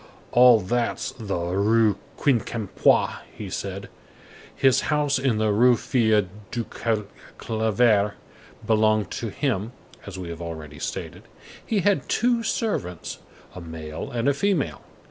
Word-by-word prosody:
"All 125 -2 +7
that's 120 +5 -1
the 105 -7 -4
Rue 100 +5 +2 0.2
Quincampois!" 115 -6 +1 0.2
he - - -6
said. - - -5 0.7
His 135 -2 +4
house 150 -3 +2
in 130 -4 +1
the 110 -1 +2
Rue 120 +4 +5
des - - -5
Filles 110 -5 +2 0.2
du 120 -1 -3 0.7
Calvaire 110 -2 +2 0.5
belonged 110 -2 +2
to 115 - -3
him, 115 -2 -2 0.3
as 100 -2 -7
we 90 -2 -6
have 85 0 -7
already 80 -3 -7
stated. - - -5 0.4
He 215 -3 0
had 200 +2 +1
two 240 0 +2
servants, 205 - -3 0.3
"a 90 - -8
male 80 -2 -7
and 120 +1 -2
a 140 - +4
female." 180 +1 0
110 Hz, 130 wpm, -24 LUFS, 100-130 Hz, 0.7 s, All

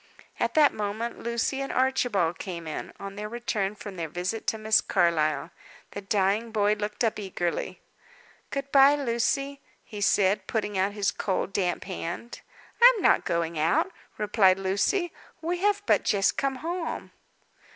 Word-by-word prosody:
At - - 0
that 300 -2 +5
moment 215 +3 -3
Lucy 235 +3 -1
and 275 - -3
Archibald 245 -10 +1
came 175 -4 -6
in, 155 - -5
on 195 0 -7
their 210 +1 -5
return 215 -4 -2
from 205 -2 -9
their 165 -2 -3
visit 180 +7 -4
to 220 - +1
Miss 215 0 +3
Carlyle. 155 -2 +1 0.4
The 200 - -6
dying 200 +2 +1
boy 210 -1 +2
looked 210 +2 -3
up 225 -2 0
eagerly. 175 -4 -3 0.7
"Good 275 0 -4
bye, 275 +1 +7
Lucy," 275 +2 -1 0.2
he 210 -1 -8
said, 200 0 +2
putting 210 -3 -2
out 190 +2 +1
his 205 -1 0
cold, 195 -1 -2
damp 180 -3 0
hand. 185 +5 -6 0.4
"I - - +10
am 390 - -4
not - - +4
going 170 -1 -1
out," 165 - +2 0.3
replied 200 -3 +3
Lucy. 200 - 0 0.3
"We 345 +2 -2
have 410 +1 +1
but - - +3
just 195 -1 +2
come 275 -1 -1
home." 330 +5 -4
210 Hz, 160 wpm, -27 LUFS, 190-255 Hz, 0.7 s, I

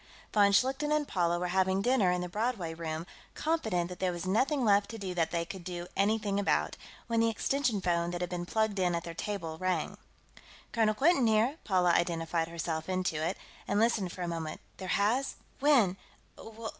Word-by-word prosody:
Von 205 -1 +5
Schlichten 270 +8 +2
and 300 -1 +1
Paula 175 -2 +1
were 180 +1 -2
having 190 +1 +2
dinner 245 -6 +3
in 180 0 +1
the 180 - -3
Broadway 205 -3 -2
Room, 160 0 -4 0.3
confident 220 - 0
that 180 0 -9
there 185 -1 +1
was 175 0 -5
nothing 255 +8 +1
left 200 -1 +4
to 225 - -6
do 190 -3 -4
that 165 -2 +1
they 170 -1 -1
could 185 +1 -8
do 175 -1 -5
anything 205 0 +1
about, 205 - +1 0.3
when 230 -1 0
the 230 0 +4
extension 245 0 0
phone 170 -1 +1
that 175 0 -3
had 180 0 -3
been 175 -1 -3
plugged 220 -1 0
in 180 -2 +2
at 170 - -2
their 170 - -6
table 165 -3 -4
rang. 185 -4 -1 0.7
"Colonel 220 -2 +2
Quinton 275 -1 +4
here," 225 +7 +2
Paula 180 -3 +3
identified 165 -1 0
herself 165 0 -4
into 180 -4 -1
it, 180 +4 -1 0.3
and 205 - +1
listened 215 -5 +2
for 180 - -5
a - - -2
moment. 165 -2 -4 0.2
"There 190 - -6
has? 235 +7 +1 0.2
When?... 245 -11 +4
190 Hz, 195 wpm, -31 LUFS, 175-220 Hz, 0.7 s, Von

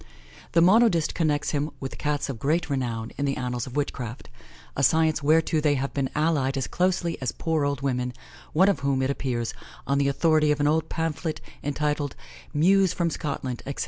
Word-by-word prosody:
The 165 - +5
monodist 185 -4 +4
connects 150 -3 0
him 145 0 -1
with 135 - -6
Cats 150 -1 -1
of 130 -5 -5
great 155 +4 0
renown 120 -4 -2
in 140 - +1
the 135 -1 -1
annals 125 -1 -3
of 130 - -9
witchcraft; 130 -4 -4 0.5
a - - -1
science 160 +3 +3
whereto 155 +1 +3
they 150 -1 +3
have 135 +1 -2
been 135 -2 -1
allied 150 -3 +1
as 135 - -1
closely 175 -3 0
as 130 - -1
poor 160 -3 -1
old 140 -1 -1
women, 125 -2 -1 0.4
one 185 +5 +4
of 200 -8 +2
whom, 140 -1 0
it 130 - +1
appears, 120 -4 -2 0.3
on 140 0 +1
the 140 - +2
authority 155 +1 +3
of 150 - 0
an 145 - +2
old 155 +2 +1
pamphlet, 160 0 -2 0.2
entitled 145 -1 -1 0.4
"Mewes 185 +4 +4
from 170 -2 0
Scotland," 135 -5 -4
etc. 140 - -5
145 Hz, 190 wpm, -26 LUFS, 135-160 Hz, 0.5 s, The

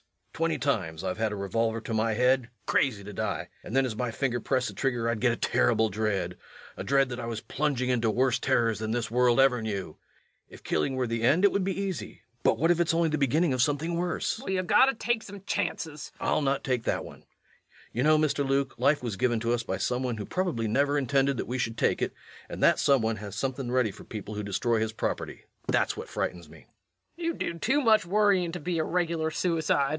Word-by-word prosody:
Twenty - - 0
times 80 +2 -1
I've 95 +2 -3
had 110 -1 +1
a - - -3
revolver 115 +3 -1
to 115 - -5
my 110 0 +1
head 125 +1 +2 0.2
crazy 110 -7 +1
to 105 +1 -8
die - - -3
and 115 - -6
then 135 0 +4
as 120 -4 -3
my 125 +2 -2
finger 120 +1 -1
pressed 130 +2 0
the - - -9
trigger 120 -4 -1
I'd 115 -1 0
get 125 -1 +4
a - - -1
terrible 110 -1 +2
dread 100 -4 -1 0.4
a - - -5
dread 135 -1 +2
that 120 0 -5
I 115 - -4
was 115 -2 -4
plunging 140 -3 -1
into 115 -2 +1
worse 125 +2 +2
terrors 115 -3 +1
than 110 0 -3
this 115 0 -2
world 125 +1 +3
ever 130 -3 +4
knew. 100 -7 -4 0.5
If - - -14
killing 130 - 0
were 130 -1 0
the 115 -1 -2
end 150 +11 +3
it 200 - +5
would 200 - 0
be 195 +1 -2
easy, 195 - -4 0.2
but - - +3
what 165 +2 +3
if 175 - +2
it's 170 -1 +2
only 165 -1 +2
the 155 -1 -1
beginning 150 +3 +2
of 130 - +1
something 150 +5 0
worse? 175 +5 -1
LUKE. 265 - -10
Well, 190 - 0
you 185 - 0
gotta 265 +8 +4
take 240 0 0
some 200 -2 -10
chances. 160 -7 -3
REVENUE. - - 0
I'll - - +2
not 135 -1 0
take 125 -3 -1
that - - -1
one. - - -12 0.7
You 120 - -1
know, 155 +3 +5
Mr. 150 -2 +1
Luke, 135 -1 0
life 145 -2 +3
was 110 -5 -3
given 120 -1 +1
to 115 +1 +1
us 120 - 0
by - - -3
some 125 0 -1
one 125 -3 -2
who 105 - -5
probably 175 -12 -1
never 140 +6 +2
intended 135 0 +1
that - - -2
we 130 +1 -3
should 115 -1 -2
take - - +1
it, - - -1 0.3
and - - -5
that - - +5
some 135 -4 +3
one 110 0 0
has 100 -2 -7
something 130 +2 -3
ready 125 -4 +2
for - - -13
people 105 -1 -7
who 105 - -3
destroy 110 +3 0
his 110 0 -1
property. - - -3 0.2
That's - - +1
what - - -7
frightens 85 -3 -3
me. - - -15 0.5
LUKE. - - -6
You 335 0 0
do 170 0 -4
too 265 +10 +2
much 220 -7 +4
worryin' 195 -3 +3
to 175 - -4
be 170 +2 -2
a - - +2
regular 165 -2 0
suicide. 165 -1 0
REVENUE. 140 - +2
130 Hz, 240 wpm, -28 LUFS, 115-160 Hz, 0.7 s, it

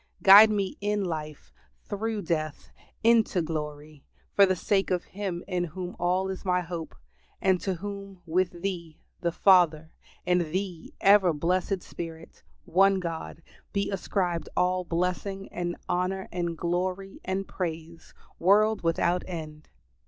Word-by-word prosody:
Guide 205 +3 +10
me 200 -3 -1
in 205 0 0
life, 155 -3 -6 0.4
through 215 0 -3
death, 155 -3 -3 0.3
into 225 -4 +4
glory, 150 -2 -5 0.3
for 200 -1 +6
the 185 - +2
sake 195 +2 +1
of 180 -1 0
Him 185 -3 -5
in 180 -2 -1
whom 175 +2 -5
is - - -15
all 185 +2 0
my 180 -2 +1
hope, 170 -2 -6 0.4
and 190 -2 +2
to 190 -2 -1
whom, 195 +1 -7
with 175 +1 -1
Thee 170 -5 -4 0.2
the 170 - 0
Father, 165 -4 +4 0.3
and 180 0 +3
Thee, 175 +1 -4
ever 195 -3 +6
blessed 180 +4 0
Spirit, 165 -1 -9 0.2
one 195 +2 +4
God, 165 -2 -6 0.3
be 200 0 0
ascribed 180 -3 -1
all 180 0 +2
blessing 180 +3 -2
and 175 0 -3
honor 185 +2 -1
and 170 -2 -2
glory 185 +3 -2
and 190 +1 -2
praise, 165 -2 -6 0.2
world 210 +4 +4
without 170 +1 +1
end. 155 -3 -7
180 Hz, 135 wpm, -27 LUFS, 165-195 Hz, 0.4 s, Guide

